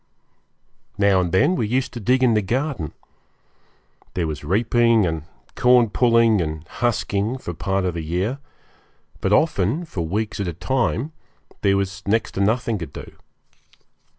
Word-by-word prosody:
Now 100 -2 +4
and 90 -2 -2
then 145 - +3
we 115 - -1
used 130 +4 -1
to 120 - -5
dig 125 +4 +2
in 120 -3 +4
the 105 - +3
garden. 120 - -2 1.2
There 90 - 0
was 75 -2 -5
reaping 115 +5 +3
and 80 -3 -3 0.3
corn 125 -3 +4
pulling 115 -4 +4
and 80 0 -4
husking 115 -1 -1
for 90 -9 -6
part 95 +3 -1
of 90 - -1
the 85 - -4
year; 90 - -2 0.8
but 95 - -1
often, 140 - +2
for 95 - -5
weeks 105 +6 -2
at 100 - -2
a 85 - -3
time, 125 - -1 0.5
there 100 -1 +3
was 95 0 -3
next 110 +1 +1
to 95 - -3
nothing 110 +1 +1
to 85 - -5
do. - - -11
105 Hz, 155 wpm, -22 LUFS, 90-120 Hz, 1.2 s, Now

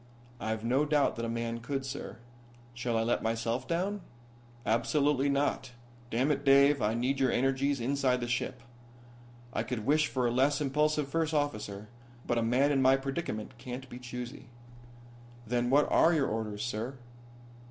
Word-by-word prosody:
"I've 110 0 -3
no 130 +5 +3
doubt 150 -1 +2
that 115 - -2
a - - -3
man 115 0 -3
could, 135 +3 -3
sir. 135 - -6 0.6
Shall 120 -1 -1
I 115 - +2
let 120 +1 +1
myself 115 +3 -1
down?" 190 +4 -1 0.6
"Absolutely 140 +4 +2
not. 140 -2 0 0.4
Damn 130 +6 +1
it, 140 -1 -1
Dave, 140 0 +5
I 105 +2 +1
need 130 +3 0
your 130 -2 +3
energies 135 +2 +1
inside 130 0 +1
the 120 - -3
ship. 120 - -2 0.9
I - - 0
could 120 -4 -4
wish 155 +3 +3
for 130 -3 -1
a 120 - +2
less 135 +3 +2
impulsive 150 +1 +1
first 160 +2 -1
officer, 105 -8 -2 0.4
but 120 - +1
a - - +1
man 125 +5 +2
in 135 -2 +2
my 130 +1 +5
predicament 135 -5 -4
can't 125 +1 -7
be 120 - -8
choosy." 125 +2 -7 1.0
"Then 120 +1 0
what 145 +3 +4
are 165 - +5
your 145 -3 +2
orders, 105 -1 -3
sir?" 120 +3 -4
130 Hz, 165 wpm, -30 LUFS, 115-140 Hz, 1.0 s, Dave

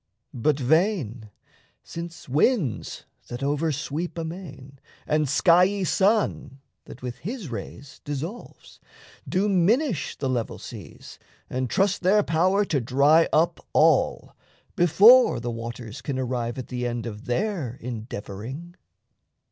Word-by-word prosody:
But 135 +4 0
vain 135 - 0 0.5
since 170 0 -8
winds 150 - 0 0.2
(that 120 +3 -6
over 145 +3 0
sweep 155 +5 -4
amain) 160 -5 -8 0.3
And 150 -1 +1
skiey 180 +7 +3
sun 190 - +1 0.3
(that 125 - -12
with 125 -1 -6
his 210 - -6
rays 135 +4 -8
dissolves) 155 - -7 0.5
Do 190 +3 +1
minish 200 - +1
the 135 - -2
level 120 -3 -2
seas - - -11 0.3
and 130 -1 -2
trust 195 - +1
their 200 +3 +4
power 185 +5 +2
To 145 -8 0
dry 140 +7 +4
up 160 +2 +2
all, - - +2 0.4
before 210 - +6
the 120 0 -4
waters 115 -1 -7
can 140 -3 -3
Arrive 125 -2 -2
at 130 - -7
the 125 -1 -2
end 120 -1 -4
of 110 0 -7
their 145 - -2
endeavouring. 120 - -7
145 Hz, 125 wpm, -25 LUFS, 125-180 Hz, 0.5 s, before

